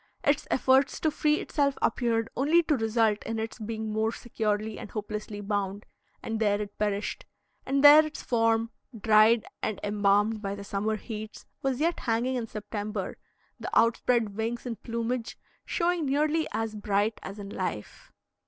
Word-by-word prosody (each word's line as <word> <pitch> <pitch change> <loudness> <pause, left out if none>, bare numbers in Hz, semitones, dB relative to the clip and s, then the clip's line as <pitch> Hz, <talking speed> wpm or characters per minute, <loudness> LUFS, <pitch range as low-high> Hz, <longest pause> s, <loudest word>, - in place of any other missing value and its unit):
Its 285 +1 +1
efforts 265 +1 +3
to 315 - +1
free 300 0 +2
itself 280 -2 0
appeared 230 -2 +1
only 315 +6 +4
to 305 -2 +2
result 225 -2 +2
in 225 - -3
its 220 +2 -4
being 220 0 -4
more 220 +1 +1
securely 215 -2 -2
and - - -8
hopelessly 210 -1 -5
bound; 205 0 -2 0.4
and 225 -1 -3
there 205 -2 +2
it 205 -1 -6
perished; 210 0 -2 0.4
and 275 +1 +1
there 295 +2 +10
its 310 0 -7
form, 225 -1 +1 0.3
dried 220 +1 +5 0.2
and 215 - -2
embalmed 205 +1 +2
by 200 -1 -3
the 200 - -8
summer 200 +2 -1
heats, 215 0 -8 0.2
was 270 -3 -1
yet 335 +2 +1
hanging 235 +2 0
in 240 -3 -2
September, 210 -2 -5 0.4
the - - -5
outspread 230 -2 +2
wings 230 +3 -3
and 230 -4 -5
plumage 235 +1 -3 0.3
showing 345 -3 0
nearly 305 +3 +1
as 225 -1 -2
bright 205 +1 0
as 195 +2 -8
in 200 -1 -7
life. 110 - -5
225 Hz, 160 wpm, -28 LUFS, 210-250 Hz, 0.4 s, there